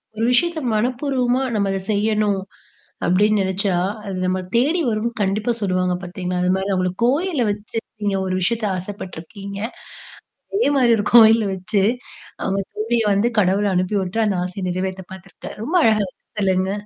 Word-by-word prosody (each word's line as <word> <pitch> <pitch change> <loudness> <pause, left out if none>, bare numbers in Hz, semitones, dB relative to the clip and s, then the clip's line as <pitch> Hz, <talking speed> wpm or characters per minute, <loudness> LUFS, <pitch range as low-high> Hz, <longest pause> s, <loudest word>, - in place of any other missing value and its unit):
ஒரு 225 +1 0
விஷயத்த 330 +5 +2
மனப்பூர்வமா 250 +2 0
நம்ம 200 -2 +1
அத 195 - -1
செய்யணும். 210 -1 +1 0.7
அப்டின்னு 205 +4 +3
நெனச்சா, 190 0 0 0.3
அது 195 -2 -4
நம்மள 185 0 -1
தேடி 295 +9 +2
வரும்னு 225 +1 -1
கண்டிப்பா 205 +4 0
சொல்லுவாங்க 185 -2 0
பாத்தீங்களா? 180 0 -3
அது 180 - +2
மாரி 190 +1 -2
அவுங்களுக்கு 185 -1 -1
கோயில்ல 300 +2 +1
வச்சு, 205 +2 -9 0.3
நீங்க 200 -1 +1
ஒரு 185 - -1
விஷயத்த 225 +3 0
ஆசைப்பட்டுருக்கீங்க. 195 +1 -7 0.9
அதே 410 -3 +3
மாதரி 250 -3 +4
ஒரு 205 - -1
கோயில்ல 225 -1 +8
வச்சு, 195 +2 0 0.6
அவுங்க 195 +1 0
தோழிய 225 +2 0
வந்து 205 +4 +2
கடவுள் 200 +1 +2
அனுப்பி 185 +3 0
உட்டு 185 +5 -2
அந்த 200 -3 0
ஆசைய 185 +1 -5
நிறைவேத்த 185 +1 -3
பாத்துருக்கார். 190 -1 -10
ரொம்ப 325 +9 0
அழகா 215 -2 +3 0.3
சொல்லுங்க. 190 -1 +1
200 Hz, 150 wpm, -21 LUFS, 185-225 Hz, 0.9 s, கோயில்ல